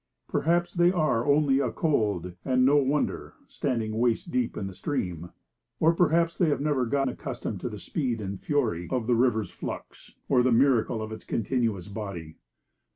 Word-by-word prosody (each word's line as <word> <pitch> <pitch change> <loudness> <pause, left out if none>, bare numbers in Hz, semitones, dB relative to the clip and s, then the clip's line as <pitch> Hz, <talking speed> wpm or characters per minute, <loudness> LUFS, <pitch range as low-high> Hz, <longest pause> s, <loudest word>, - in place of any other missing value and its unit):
Perhaps 175 +3 +1
they 175 0 +4
are 155 -9 +1
only 140 -2 +4
a - - +1
cold, 105 - 0
and 130 -1 +3
no 145 +2 +5
wonder, 145 +1 0
standing 115 -5 -2
waist 120 -2 +1
deep 125 -2 -1
in 100 - -3
the 95 - -6
stream. 90 - -3 0.5
Or 165 +1 +4
perhaps 170 0 +2
they 175 -4 +2
have 145 - +1
never 140 -4 0
got 135 +2 +1
accustomed 125 - -5
to - - -3
the - - -7
speed 125 -6 -2
and 100 -2 -5
fury 90 - 0
of 125 -3 -1
the 125 - +2
river's 115 -3 +1
flux, - - -8
or 130 -2 +4
the 125 +1 +2
miracle 115 -2 +3
of 110 - -6
its 110 - -8
continuous 115 -4 -1
body. 100 -6 -7
125 Hz, 175 wpm, -27 LUFS, 110-145 Hz, 0.5 s, no